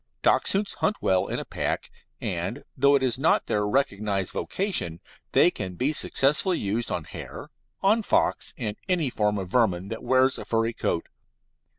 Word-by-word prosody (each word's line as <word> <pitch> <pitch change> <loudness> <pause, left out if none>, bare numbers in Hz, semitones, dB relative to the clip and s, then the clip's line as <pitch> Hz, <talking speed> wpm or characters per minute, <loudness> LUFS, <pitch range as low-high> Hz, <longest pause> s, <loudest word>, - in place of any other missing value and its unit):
Dachshunds 200 +1 +2
hunt 210 - +1
well 95 0 +1
in - - -3
a - - -4
pack, - - -3 0.3
and, - - -3
though 140 +2 +4
it 135 - +1
is 130 -1 0
not 155 - +3
their 105 0 0
recognised 105 -5 0
vocation, 180 - -2 0.3
they 175 - +5
can 95 - -5
be 135 - 0
successfully 150 +6 +2
used 110 +4 -2
on 85 - -2
hare, - - -9 0.3
on 215 +4 +4
fox, - - +1
and 110 -4 -4
any 165 -8 +2
form 105 -2 0
of 95 -2 -5
vermin 95 -6 +1
that 115 - -5
wears 130 +1 +3
a - - -7
furry 115 0 0
coat. 85 - -2
120 Hz, 170 wpm, -26 LUFS, 100-140 Hz, 0.3 s, they